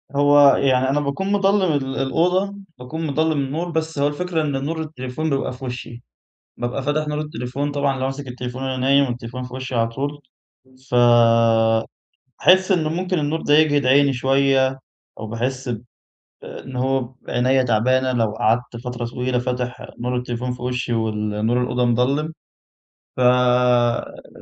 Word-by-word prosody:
هو 145 -1 +6
يعني 130 -1 +2
أنا 145 +2 +1
باكون 145 +8 -2
مضلّم 195 -2 +2
ال 135 -1 -2
الأوضة، 180 +8 +1 0.2
باكون 160 +6 -5
مضلّم 160 +3 +1
النور، 155 +6 -3
بس 160 -2 -2
هو 145 - +3
الفكرة 165 +2 -2
إن 140 -2 -2
نور 160 +1 -3
التليفون 155 0 -4
بيبقى 135 -2 -1
في 130 +1 -9
وشي، 120 -1 -7 0.5
بابقى 120 +3 -3
فاتح 150 +2 -1
نور 150 0 -2
التليفون 140 -1 -4
طبعًا 140 -2 0
لو 130 - -2
ماسِك 135 0 -5
التليفون 125 +1 -6
وأنا 130 -1 -2
نايم 140 +2 +3
والتليفون 120 +1 -6
في 125 0 -8
وشي 130 -1 -5
على 115 -1 +1
طول، 140 +5 -4 0.7
فباحس 115 -2 +3 0.7
إنه 160 -4 +1
ممكن 180 +1 -1
النور 150 +2 -1
ده 145 - +3
يجهِد 145 -3 +3
عيني 140 +1 +4
شوية، 135 +1 +2 0.4
أو 110 - -5
باحس 125 +4 -3
ب 115 -2 -3 0.6
إن 130 - -9
هو 135 +1 +1
ب 125 +1 -10
عينيَّ 130 +1 +2
تعبانة 130 +3 +2
لو 115 -3 0
قعدت 120 +2 0
فترة 125 -1 -4
طويلة 125 +1 -2
فاتح 125 0 -3
نور 125 +1 -2
التليفون 125 0 -3
في 125 0 -9
وشي 125 -1 -2
وال 105 -1 -1
نور 125 +2 +2
الأوضة 125 0 0
مضلِّم، 135 +6 +1 0.8
ففعلًا 125 -1 +2
130 Hz, 155 wpm, -21 LUFS, 125-145 Hz, 0.8 s, هو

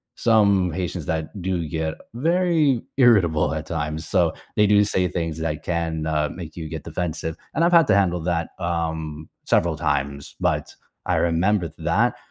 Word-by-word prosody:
some 100 -6 +3
patients 90 -1 -3
that 80 +5 -3
do 90 -3 -1
get 80 0 -2 0.2
very 160 -3 +2 0.2
irritable 95 - +4
at 80 0 -4
times. 80 0 -3
So, 85 -3 +2 0.2
they 105 - +4
do 105 0 +5
say 95 -3 +1
things 85 -3 -3
that 80 -2 -2
can, 80 -2 -2
uh, 75 -1 0
make 80 -3 -9
you 80 -2 -5
get 80 -1 -6
defensive, 80 -2 -3 0.2
and 165 - +1
I've 175 +1 +3
had 165 -1 +7
to 105 - +4
handle 90 -3 +2
that, 85 0 -1
um, 80 -3 -3 0.2
several - - +2
times. 70 0 -2
But - - -1 0.3
I - - +1
remember 85 +2 +1
that 95 +9 +1
85 Hz, 165 wpm, -23 LUFS, 80-100 Hz, 0.3 s, had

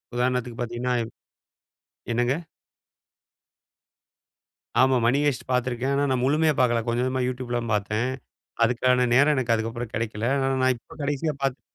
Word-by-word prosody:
உதாரணத்துக்கு 125 -1 -1
பார்த்தீங்கன்னா 120 +1 -2 1.2
என்னங்க? 120 +2 +1 2.5
ஆமா. 130 0 +4
மணி 125 +4 +3
ஹேய்ஸ்ட் 140 -5 -1
பார்த்திருக்கேன். 125 +1 0
ஆனா 140 +1 +2
நான் 130 -1 +1
முழுமையா 155 +3 +3
பார்க்கல. 120 -2 +3
கொஞ்சம், 120 +2 +1
கொஞ்சமா 130 0 0
YouTube 125 -1 -5
ல 120 - +1
தான் 115 -1 -3
பார்த்தேன். 105 +3 0 0.6
அதுக்கான 125 +1 +2
நேரம் 145 +4 +5
எனக்கு 125 -3 +1
அதுக்கபபுறம் 115 +1 -3
கெடைக்கல. 110 0 -2
ஆனா 135 0 +1
நான் 130 0 +4
இப்ப 115 - -16
கடைசியா 145 +2 -1
பாக் 135 -1 -1
125 Hz, 140 wpm, -25 LUFS, 120-130 Hz, 2.5 s, நேரம்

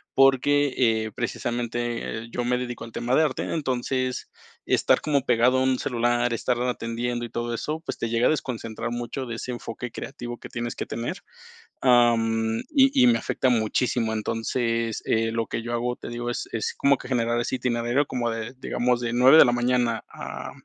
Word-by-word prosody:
porque, 135 +1 +4
eh, 110 -3 +2
precisamente, 120 -1 -3
eh, - - -10
yo 120 - -2
me 125 0 +1
dedico 120 -2 -5
al 115 - -11
tema 125 +2 -2
de - - +5
arte. 145 -4 -1
Entonces, 130 -3 -2 0.4
estar - - +3
como 145 -3 +1
pegado 125 +1 +3
a - - +2
un 130 -1 +2
celular, 120 -1 +1
estar 120 +1 0
atendiendo 120 0 -2
y 120 - -8
todo 120 0 -3
eso, 155 +7 -3
pues - - -4
te 115 - -2
llega 115 +1 +2
a - - +4
desconcentrar 120 -5 -3
mucho 120 +3 -4
de 115 - -4
ese 125 - -5
enfoque 120 0 -6
creativo 120 0 -7
que - - -10
tienes 120 -1 -4
que - - -4
tener, 115 +1 -4 0.6
am, 115 -3 +3
y 270 -2 +7 0.2
y 250 - +7
me 235 - +4
afecta 130 - 0
muchísimo. 115 0 +1
Entonces, 115 +1 -1
eh, 115 0 +1
lo 115 0 -1
que 115 - -3
yo 120 +1 -5
hago, 120 +1 -1
te - - -9
digo, 120 0 -4
es - - -4
es 115 - -2
como 140 -1 +4
que - - -10
generar 120 -1 +1
ese 130 - -2
itinerario 120 +3 0
como 120 -2 -1
de, 115 +2 -5
digamos, 125 -1 0
de 120 0 -2
9 130 +5 +7
de - - +10
la 120 - +3
mañana, 120 -1 +1
a - - -7
120 Hz, 195 wpm, -25 LUFS, 115-125 Hz, 0.6 s, de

